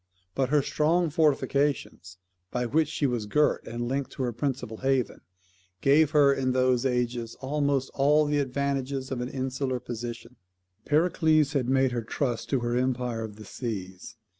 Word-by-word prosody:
But 135 Hz, +3 st, 0 dB
her 145 Hz, -1 st, +3 dB
strong 165 Hz, +3 st, +1 dB
fortifications, 140 Hz, -, 0 dB, 0.3 s
by 125 Hz, +3 st, -2 dB
which 155 Hz, +5 st, +2 dB
she 150 Hz, -, -2 dB
was 120 Hz, -5 st, -1 dB
girt 150 Hz, +8 st, +1 dB
and 120 Hz, +1 st, -4 dB
linked 135 Hz, +2 st, -2 dB
to 135 Hz, -, -3 dB
her 120 Hz, -1 st, -1 dB
principal 120 Hz, -3 st, -3 dB
haven, 135 Hz, -1 st, 0 dB, 0.6 s
gave 145 Hz, +2 st, +4 dB
her, 145 Hz, -2 st, +5 dB
in 130 Hz, -2 st, 0 dB
those 130 Hz, 0 st, +2 dB
ages, 120 Hz, -2 st, -2 dB
almost 140 Hz, -1 st, -1 dB
all 150 Hz, +2 st, +4 dB
the 145 Hz, 0 st, +1 dB
advantages 135 Hz, 0 st, -2 dB
of 125 Hz, -2 st, -2 dB
an 125 Hz, -, -3 dB
insular 130 Hz, -1 st, -2 dB
position. 120 Hz, 0 st, -7 dB, 0.5 s
Pericles 155 Hz, -1 st, +3 dB
had 130 Hz, -4 st, 0 dB
made 130 Hz, -1 st, +3 dB
her 120 Hz, -1 st, -2 dB
trust 120 Hz, +1 st, -3 dB
to 135 Hz, -3 st, +1 dB
her 120 Hz, 0 st, -1 dB
empire 125 Hz, -2 st, -1 dB
of 110 Hz, -2 st, -7 dB
the 110 Hz, 0 st, -11 dB
seas. 100 Hz, -2 st, -6 dB
130 Hz, 165 wpm, -27 LUFS, 120-140 Hz, 0.6 s, her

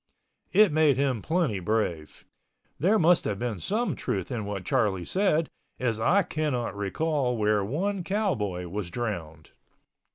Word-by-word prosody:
It 205 Hz, -1 st, +5 dB
made 150 Hz, -3 st, +4 dB
him 135 Hz, -5 st, 0 dB
plenty 160 Hz, -, 0 dB
brave. 90 Hz, -6 st, -2 dB, 0.5 s
There 190 Hz, -, +3 dB
must 175 Hz, -1 st, +4 dB
have 100 Hz, -, -1 dB
been 115 Hz, -3 st, -3 dB
some 225 Hz, -, -1 dB
truth 95 Hz, -3 st, -3 dB
in 115 Hz, -4 st, -3 dB
what 100 Hz, -3 st, -5 dB
Charlie 100 Hz, -8 st, +1 dB
said, 175 Hz, -5 st, +1 dB, 0.3 s
as 115 Hz, -3 st, 0 dB
I 180 Hz, -, +3 dB
cannot 150 Hz, -, -2 dB
recall 125 Hz, +5 st, -1 dB
where 105 Hz, -1 st, +2 dB
one 180 Hz, -, -2 dB
cowboy 110 Hz, -, -1 dB
was 95 Hz, 0 st, -4 dB
drowned. 85 Hz, -9 st, -5 dB
120 Hz, 140 wpm, -27 LUFS, 100-165 Hz, 0.5 s, It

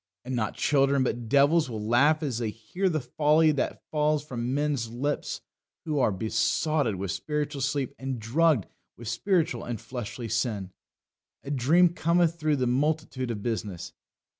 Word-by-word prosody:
And 130 Hz, 0 st, -3 dB
not 110 Hz, -4 st, -1 dB
children 140 Hz, -1 st, +2 dB
but 120 Hz, -2 st, -3 dB
devils 145 Hz, +2 st, +4 dB
will 110 Hz, -2 st, -4 dB
laugh 145 Hz, +7 st, +4 dB
as 130 Hz, -6 st, -2 dB
they 115 Hz, -2 st, -1 dB
hear 115 Hz, -, -2 dB
the 155 Hz, -3 st, 0 dB
folly 150 Hz, +5 st, +3 dB
that 140 Hz, -, -2 dB
falls 150 Hz, -1 st, +1 dB
from 125 Hz, -3 st, -3 dB
men's 145 Hz, -6 st, 0 dB
lips 135 Hz, +6 st, -3 dB, 0.4 s
who 150 Hz, -3 st, 0 dB
are 120 Hz, -, +3 dB
besotted 110 Hz, +5 st, 0 dB
with 95 Hz, -1 st, -3 dB
spiritual 150 Hz, -2 st, -3 dB
sleep 140 Hz, -1 st, -1 dB
and 130 Hz, -2 st, -4 dB
drugged 135 Hz, -, +2 dB, 0.3 s
with 120 Hz, -, -9 dB
spiritual 170 Hz, -, 0 dB
and 120 Hz, -3 st, -4 dB
fleshly 120 Hz, 0 st, -6 dB
sin. 110 Hz, -5 st, -2 dB, 0.7 s
A 140 Hz, -, -6 dB
dream 155 Hz, +7 st, +4 dB
cometh 170 Hz, 0 st, +2 dB
through 155 Hz, -1 st, +2 dB
the 130 Hz, -2 st, 0 dB
multitude 135 Hz, 0 st, 0 dB
of 105 Hz, -3 st, -4 dB
business. 105 Hz, -7 st, -4 dB
135 Hz, 160 wpm, -27 LUFS, 115-155 Hz, 0.7 s, devils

